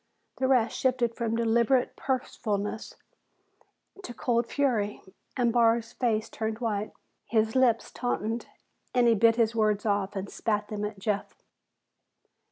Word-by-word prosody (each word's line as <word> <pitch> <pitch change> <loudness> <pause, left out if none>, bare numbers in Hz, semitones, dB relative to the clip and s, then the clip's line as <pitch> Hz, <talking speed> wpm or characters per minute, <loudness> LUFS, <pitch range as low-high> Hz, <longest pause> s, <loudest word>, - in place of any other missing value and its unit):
The 260 - +1
rest 250 -3 +3
shifted 250 -3 +1
from 230 -1 -2
deliberate 235 +2 +2
purposefulness 220 -5 -3 1.1
to 245 - -7
cold 235 -1 0
fury, 230 -8 0 0.3
and 240 -2 +2
Barr's 230 -1 +3
face 220 -4 0
turned 220 -1 -3
white. 215 -3 -2 0.4
His 220 0 +1
lips 245 -3 +3
tautened, 230 -2 -2 0.5
and 245 -1 +4
he 230 - +6
bit 225 +1 +4
his 230 -1 +2
words 215 -2 +1
off 205 -1 0
and 195 0 -3
spat 210 0 -2
them 210 -1 -4
at 210 0 -5
Jeff. 205 +1 -3
225 Hz, 135 wpm, -28 LUFS, 215-240 Hz, 1.1 s, he